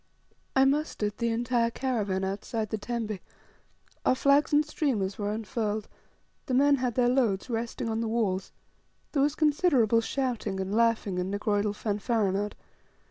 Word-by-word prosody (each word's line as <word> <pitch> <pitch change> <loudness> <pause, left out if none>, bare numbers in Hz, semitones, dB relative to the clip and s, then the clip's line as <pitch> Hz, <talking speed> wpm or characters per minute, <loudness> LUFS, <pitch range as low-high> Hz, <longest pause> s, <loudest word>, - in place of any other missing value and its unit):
I 265 0 +6
mustered 270 -7 0
the 235 - +1
entire 235 0 +1
caravan 215 -7 -1
outside 210 +3 -3
the 220 - 0
tembe, 215 -2 -3 0.8
our - - +3
flags 280 +2 +3
and 300 +1 +4
streamers 230 -11 -1
were 205 0 -1
unfurled, 215 -1 -2 0.6
the 255 - 0
men 285 +2 +5
had 250 -3 -1
their 245 -1 +3
loads 245 -3 +1
resting 230 0 -3
on 225 0 -1
the 230 - -1
walls, 210 -5 -1 0.6
there 280 - +1
was 290 +2 +2
considerable 285 - +3
shouting, 235 -6 -2
and 190 +1 -3
laughing, 225 -4 +2
and 180 +1 -2
negroidal 205 0 0
fanfaronnade. 205 -1 -1
230 Hz, 145 wpm, -28 LUFS, 205-255 Hz, 0.8 s, I